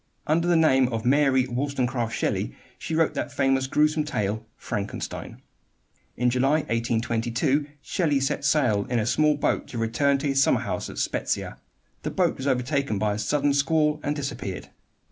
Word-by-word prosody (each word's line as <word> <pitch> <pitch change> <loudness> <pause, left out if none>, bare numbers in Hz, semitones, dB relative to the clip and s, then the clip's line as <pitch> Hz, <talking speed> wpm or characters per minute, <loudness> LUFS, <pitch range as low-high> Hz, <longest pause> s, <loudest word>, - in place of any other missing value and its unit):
Under 165 +3 +1
the 175 - +4
name 135 -5 +4
of 115 -2 -3
Mary 135 -1 +3
Wollstonecraft 125 -2 -1
Shelley - - -1 0.2
she 160 - -3
wrote 165 -1 +2
that - - -3
famous 135 0 +1
grewsome 150 +2 +2
tale, 110 -6 -2
"Frankenstein." 100 0 -5 0.7
In 125 +1 +2
July, 135 +5 +2
1822, 120 +4 0 0.2
Shelley 150 -6 +1
set 135 +2 -1
sail 125 -8 +2
in 125 - -1
a 110 - +1
small 150 +5 +3
boat - - 0
to 120 - -7
return 120 +5 +1
to 140 +2 -2
his 135 -1 +2
summer 125 -4 +3
home 100 -6 -3
at - - -9
Spezia. - - -2 0.4
The - - -3
boat - - +1
was 135 - -4
overtaken 130 -2 0
by 105 +1 0
a 105 - -4
sudden 145 +6 +1
squall 150 +2 +2
and 145 - -1
disappeared. 135 -10 -5
135 Hz, 165 wpm, -25 LUFS, 115-145 Hz, 0.7 s, the